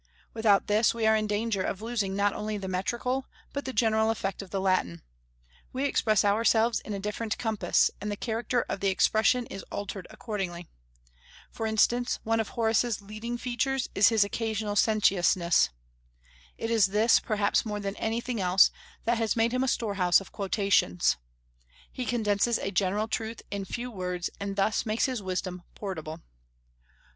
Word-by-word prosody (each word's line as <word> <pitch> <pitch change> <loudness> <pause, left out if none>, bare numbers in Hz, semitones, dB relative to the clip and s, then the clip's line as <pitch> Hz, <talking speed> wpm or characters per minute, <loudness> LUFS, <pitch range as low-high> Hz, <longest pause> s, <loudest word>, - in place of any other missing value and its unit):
Without 220 -3 +3
this 215 +2 +2
we 230 -1 -1
are 220 0 +5
in 215 -1 0
danger 210 -1 -1
of 190 - -2
losing 215 -4 -2
not 200 0 +2
only 210 0 -3
the 195 -1 -5
metrical, 240 +8 -2 0.3
but 280 - -4
the 260 - -3
general 220 -3 +2
effect 195 -4 -2
of 195 - -10
the 195 - -2
Latin; 185 - 0 0.7
we 265 +2 -1
express 215 -7 +2
ourselves 225 +2 +3
in - - -9
a - - -4
different 210 +2 -3
compass, 220 -3 +1
and 210 +1 -3
the - - -2
character 230 +2 -1
of - - -3
the 200 - 0
expression 220 +5 +3
is 195 - -7
altered 200 -2 -5
accordingly. 185 -6 -5 0.8
For 225 - -3
instance, 240 +3 +2
one 225 +1 +1
of 220 - -1
Horace's 230 0 +1
leading 215 +4 -5
features 255 +2 -1
is 200 - +5
his 220 -3 +4
occasional 215 0 -2
sententiousness. 190 - +3 0.9
It 225 - -3
is 220 -4 +4
this, 215 +4 +4
perhaps 210 -2 +1
more 210 -2 -4
than 200 0 -4
anything 230 0 -2
else, 185 +1 +5 0.3
that 235 +1 +1
has 225 -2 +1
made 230 0 +2
him 255 +1 +1
a - - 0
storehouse 200 -7 +2
of 195 - -12
quotations. 195 - +1 0.7
He 255 - -4
condenses 220 0 +1
a 195 - -3
general 200 +3 0
truth 225 0 -4
in 200 -1 -2
a - - -6
few 245 +5 -5
words, 180 -3 -3
and 200 0 -4
thus 205 +2 +1
makes 220 -1 0
his 255 -5 -2
wisdom 185 -1 -3
portable. 160 -5 -6
215 Hz, 170 wpm, -28 LUFS, 195-230 Hz, 0.9 s, are